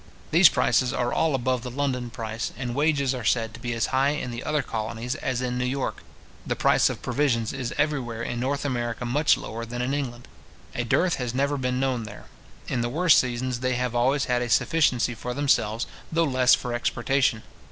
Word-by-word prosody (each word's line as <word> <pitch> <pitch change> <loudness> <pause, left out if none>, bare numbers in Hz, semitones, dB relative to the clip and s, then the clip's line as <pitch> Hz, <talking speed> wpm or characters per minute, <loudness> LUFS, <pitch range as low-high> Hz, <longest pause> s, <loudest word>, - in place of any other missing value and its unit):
These - - +8
prices 125 -1 +2
are 120 -2 -1
all 160 -3 +2
above 130 -1 0
the 125 - -6
London 125 -2 -2
price; 115 -1 -4
and 125 -1 -3
wages 140 -1 +1
are 125 -2 -5
said 115 +1 +1
to 115 - -10
be 120 0 -4
as 115 - 0
high 135 +2 +3
in 145 -4 -3
the 120 +1 -6
other 150 -2 0
colonies 115 +2 -4
as 130 -1 -2
in 125 0 -2
New - - 0
York. 130 +1 -2 0.4
The - - -2
price - - +3
of - - -6
provisions 120 -6 0
is 130 -3 -4
everywhere 130 -6 -1
in 120 0 -3
North 140 +3 -1
America 120 -3 -2
much 145 +5 +3
lower 115 +2 -6
than 120 +1 -6
in 130 +3 -1
England. 125 -4 -4 0.5
A - - -2
dearth 170 +9 +1
has 125 -2 -3
never 140 +2 +1
been 125 -2 -1
known 130 -4 0
there. 105 -1 -10 0.4
In 120 - -1
the 120 - -1
worst 165 +4 +5
seasons 125 0 -2
they 130 0 0
have 125 -1 -1
always 130 +4 +2
had 125 -1 +1
a 120 - -2
sufficiency 125 -5 +2
for 125 +2 -5
themselves, 115 -5 +1 0.3
though 165 +1 +2
less 130 -4 +4
for 120 -2 -5
exportation. 120 0 0
125 Hz, 205 wpm, -25 LUFS, 120-135 Hz, 0.5 s, These